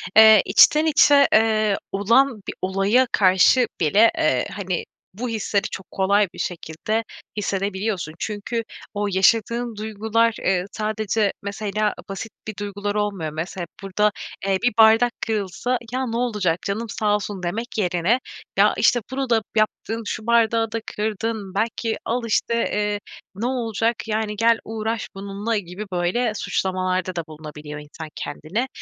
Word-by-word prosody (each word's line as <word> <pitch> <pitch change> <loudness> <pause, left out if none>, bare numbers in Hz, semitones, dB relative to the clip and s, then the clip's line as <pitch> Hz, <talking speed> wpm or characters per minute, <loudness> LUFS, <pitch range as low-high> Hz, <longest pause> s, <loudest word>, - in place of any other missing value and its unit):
eee, 220 -2 +9
içten 300 +10 +6
içe, 285 -2 +6
eee, 215 -2 +3
olan 230 +4 +3
bir - - -3
olaya 195 +7 +2
karşı 195 +6 +5
bile, 205 +9 +5
eee, 130 -4 +1
hani, 185 -3 -3 0.3
bu 240 +6 -4
hisleri 210 -2 0
çok 190 - -8
kolay 200 +2 +2
bir - - -11
şekilde 175 +6 -3 0.3
hissedebiliyorsun. 195 -3 -2
Çünkü 220 +2 -3 0.3
o 205 0 -1
yaşadığın 230 +5 +2
duygular, 220 +2 0
eee, 185 -1 +1
sadece, 215 -1 -1
mesela, 210 +1 -1 0.2
basit 195 +3 -6 0.2
bir 215 - -5
duygular 205 0 -3
olmuyor. 200 -7 -1
Mese 170 +4 -5
hep 170 - -5
burada, 210 +2 +1 0.3
eee, 195 -1 +2
bir 245 - +2
bardak 225 +2 +6 0.2
kırılsa 220 +3 -1
"Ya, 260 +1 -1
ne 230 0 -2
olacak 210 -9 0
canım 220 +3 -3
sağ 210 0 +1
olsun." 200 -2 -4
demek 225 +8 -4
yerine 180 +4 +1 0.4
"Ya, - - +5
işte, 240 - +4
bunu 265 -1 -2
da 230 -2 +3
yaptın, 220 +1 0
şu 215 +2 -5
bardağı 230 -1 +3
da 230 - -2 0.2
kırdın." 215 -1 -3
belki 225 +1 -1
"Al, 245 +2 0
işte, 225 +1 +1
eee, 210 -2 0 0.4
ne 215 +5 -3
olacak, 235 -2 0
yani, 215 -1 -1
gel 230 +1 +3
uğraş 220 0 -3
bununla." 200 +3 -3
gibi 190 +1 -6
böyle 185 +7 0
suçlamalarda 185 -2 -1
da 170 - -2
bulunabiliyor 150 -1 -9
insan 150 +2 -9
kendine. 180 - -3
210 Hz, 145 wpm, -22 LUFS, 190-230 Hz, 0.4 s, eee